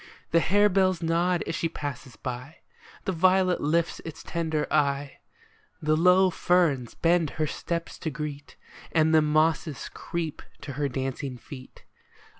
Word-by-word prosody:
The 165 - +5
harebells 190 -1 +3
nod 170 +2 +1
as - - -3
she 165 - -1
passes 135 -5 -6
by, 125 +4 -6 0.5
The 190 - 0
violet 185 +1 +3
lifts 165 +3 +1
its 160 -1 -8
tender 160 -3 -1
eye, 140 -2 0 0.6
The 155 -2 +2
low 180 +3 +5
ferns 165 -9 +1
bend 170 -2 +2
her 155 - +1
steps 170 +2 -4
to 160 - -2
greet, 145 0 -6 0.4
And 160 -1 +3
the 160 - +6
mosses 155 -1 +1
creep 165 -3 -4 0.2
to 140 - -6
her 140 +1 -1
dancing 130 0 -4
feet. 130 +1 -12
160 Hz, 140 wpm, -27 LUFS, 145-170 Hz, 0.6 s, the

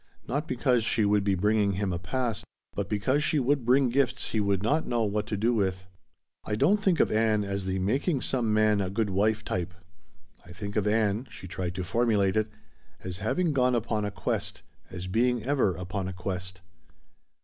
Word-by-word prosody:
Not 145 +6 -2
because 125 -2 +1
she 110 -1 +2
would 100 0 +3
be 100 -1 +2
bringing 105 +1 +2
him 95 -1 -1
a 85 - -2
"past," 115 +4 -2 0.3
but - - -3
because 130 +8 +1
she 155 - +2
would 140 0 +1
bring 130 +2 +4
gifts 130 0 0
he 110 - 0
would 100 -2 +1
not 150 +8 +1
know 120 -2 +1
what 105 0 -1
to 105 - -2
do 115 +4 +2
with. 95 -4 -1 0.6
"I 105 - -2
don't 150 - +4
think 190 -5 +2
of - - +3
Ann 110 -1 +2
as 100 -1 -3
the 95 0 -1
making 130 - 0
some 120 -5 0
man 105 -1 +3
a 95 - -1
good 100 +1 -1
wife 105 +3 +1
type. 90 0 -3 0.7
I 85 - -13
think 100 +2 -6
of 105 -1 +1
Ann," 110 +2 +1
she 95 - -10
tried 90 -1 -4
to 90 - -3
formulate 105 -1 +1
it, 110 0 +1 0.5
"as 90 0 -5
having 160 - 0
gone 125 -2 +3
upon 110 -2 -1
a 105 - -1
quest, 95 -2 -3 0.3
as 90 -1 -6
being 120 +4 +1
ever 130 -9 +1
upon 90 +2 -4
a 95 - -4
quest." 90 0 -5
105 Hz, 200 wpm, -28 LUFS, 95-120 Hz, 0.7 s, bring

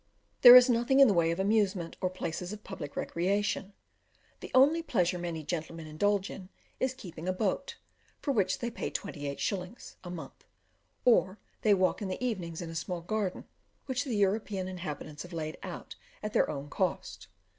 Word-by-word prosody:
There 245 -1 +12
is 250 0 +10
nothing 245 +2 +3
in 275 - +9
the 205 - +4
way 170 -2 +3
of 170 +2 -1
amusement, 195 -4 +1
or 185 - +1
places 180 0 -4
of 210 0 -8
public 160 -7 -7
recreation; 200 +2 -1 0.7
the - - -8
only 290 +6 +6
pleasure 180 - 0
many 170 -2 -4
gentlemen 165 0 -4
indulge 195 +6 0
in, 185 -1 -9 0.3
is 260 0 0
keeping 175 -7 -9
a - - +2
boat, 200 +8 -2 0.4
for 285 - -1
which 190 -7 +1
they 240 0 -3
pay - - -4
28s. 180 - -4
a 180 - -7
month, 160 -6 -9 0.6
or 215 -5 +4 0.2
they 210 -2 +5
walk 185 +3 +1
in 200 - -2
the 190 +7 -3
evenings 175 -8 -3
in 165 - -6
a - - -8
small 175 +1 -3
garden, 200 +1 -2 0.4
which 255 -2 -1
the 255 -6 -3
European 200 -1 0
inhabitants 155 -4 -6
have 180 0 -9
laid 155 -1 -4
out - - -7 0.3
at 210 0 -4
their - - +3
own 140 -1 -4
cost. - - -3
185 Hz, 175 wpm, -30 LUFS, 170-215 Hz, 0.7 s, There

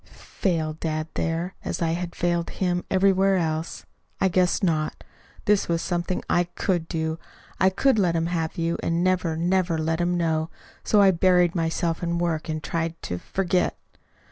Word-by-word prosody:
Fail 160 -5 -2
dad 155 0 -3
there, 165 +3 -2
as - - -3
I 165 -2 +1
had 170 +1 -3
failed 175 -1 0
him 180 -2 -1
everywhere 195 0 +3
else? 160 -1 -2 0.3
I 190 - +3
guess 180 +2 +2
not! 155 -4 0 0.4
This 205 -1 +3
was 170 -1 +1
something 175 0 -2
I 175 - +2
COULD 175 -1 -2
do. 160 0 -2 0.4
I 190 - +5
could 220 +5 +2
let 175 -4 +2
him 165 0 +1
have 165 -2 -2
you, 170 0 -1
and 170 +1 0
never, 180 -3 +1
never 175 0 +1
let 160 +1 0
him 175 0 +1
know. 160 -1 0 0.3
So 210 - +4
I 195 - +7
buried 180 -1 +3
myself 165 0 -1
in 170 -1 -1
work 165 -2 -1
and 155 -1 -3
tried 165 +3 -2
to 90 - -3
forget. 185 - 0
170 Hz, 170 wpm, -25 LUFS, 165-185 Hz, 0.4 s, I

